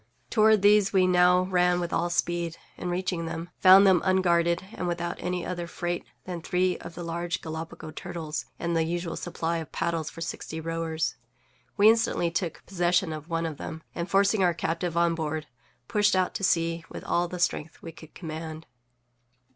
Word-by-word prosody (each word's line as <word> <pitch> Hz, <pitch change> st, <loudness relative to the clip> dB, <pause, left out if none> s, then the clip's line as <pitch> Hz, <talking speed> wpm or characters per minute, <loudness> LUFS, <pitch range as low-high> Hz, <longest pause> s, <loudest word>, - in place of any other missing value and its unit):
Toward 215 Hz, -2 st, +5 dB
these 205 Hz, -1 st, +5 dB
we 190 Hz, -2 st, +4 dB
now 180 Hz, 0 st, +5 dB
ran 180 Hz, -1 st, +2 dB
with 175 Hz, -1 st, -3 dB
all 175 Hz, +1 st, +1 dB
speed, 175 Hz, -1 st, -1 dB, 0.2 s
and, 180 Hz, -, -4 dB
reaching 175 Hz, -2 st, -2 dB
them, 165 Hz, +2 st, -5 dB
found 190 Hz, +2 st, +8 dB
them 185 Hz, -3 st, +5 dB
unguarded, 170 Hz, -2 st, +2 dB
and 180 Hz, -, -3 dB
without 175 Hz, 0 st, -2 dB
any 180 Hz, 0 st, -2 dB
other 175 Hz, -2 st, -4 dB
freight 175 Hz, 0 st, -3 dB, 0.2 s
than 175 Hz, -2 st, -5 dB
three 180 Hz, +2 st, +1 dB
of 170 Hz, -, -9 dB
the 175 Hz, -, -6 dB
large 170 Hz, +1 st, -3 dB
Gallipago 160 Hz, 0 st, -7 dB
turtles 160 Hz, -7 st, -5 dB
and 170 Hz, 0 st, -2 dB
the 165 Hz, -, +3 dB
usual 170 Hz, +1 st, -3 dB
supply 170 Hz, -1 st, -2 dB
of 160 Hz, -, -8 dB
paddles 165 Hz, -2 st, -1 dB
for 165 Hz, -, -12 dB
sixty 160 Hz, -1 st, -5 dB
rowers. 160 Hz, -4 st, -2 dB, 0.6 s
We 205 Hz, +1 st, +6 dB
instantly 220 Hz, -6 st, +3 dB
took 170 Hz, -1 st, -3 dB
possession 175 Hz, -2 st, +1 dB
of 155 Hz, +2 st, -8 dB
one 165 Hz, 0 st, -1 dB
of 160 Hz, -3 st, -4 dB
them, 160 Hz, 0 st, -7 dB
and, 170 Hz, +1 st, -4 dB
forcing 200 Hz, +1 st, +3 dB
our 175 Hz, -2 st, +3 dB
captive 165 Hz, +1 st, -2 dB
on 170 Hz, 0 st, +3 dB
board, 155 Hz, -1 st, -3 dB, 0.4 s
pushed 205 Hz, -2 st, +3 dB
out 185 Hz, -1 st, +1 dB
to -, -, -5 dB
sea 165 Hz, -2 st, +1 dB
with -, -, -8 dB
all 175 Hz, +1 st, +1 dB
the 180 Hz, -, -6 dB
strength 165 Hz, -2 st, -2 dB
we 165 Hz, -, -7 dB
could 160 Hz, -1 st, -15 dB
command. 160 Hz, -1 st, -6 dB
175 Hz, 185 wpm, -27 LUFS, 165-180 Hz, 0.6 s, found